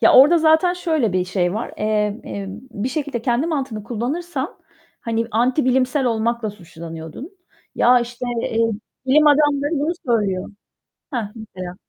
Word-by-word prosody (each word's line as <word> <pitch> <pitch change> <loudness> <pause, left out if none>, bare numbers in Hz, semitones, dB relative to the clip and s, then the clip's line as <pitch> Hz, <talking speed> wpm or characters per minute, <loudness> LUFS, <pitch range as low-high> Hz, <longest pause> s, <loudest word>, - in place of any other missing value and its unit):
Ya, - - +6
orada 295 +7 +8
zaten 320 +3 +4
şöyle 315 - 0
bir 185 0 +1
şey 180 -1 0
var. 220 - -4
Emm, 210 0 0
emm, 200 +1 -6
bir 225 +1 -3
şekilde 270 -3 -3
kendi 245 +4 +1
mantığını 270 -9 -2
kullanırsan 270 - -3 0.4
hani, 230 0 -1
antibilimsel 255 +3 +2
olmakla 230 -1 0
suçlanıyordun. 170 - -9 0.4
Ya, 245 +1 +5
işte, 240 +1 -5 0.2
eee, 225 - -2 0.5
"Bilim 300 +4 +5
adamları 290 -1 +4
bunu 305 +4 0
söylüyor." 205 -6 0 0.6
Hah. 230 -7 -3
Mesela. 185 -6 -8
240 Hz, 135 wpm, -21 LUFS, 210-285 Hz, 0.6 s, orada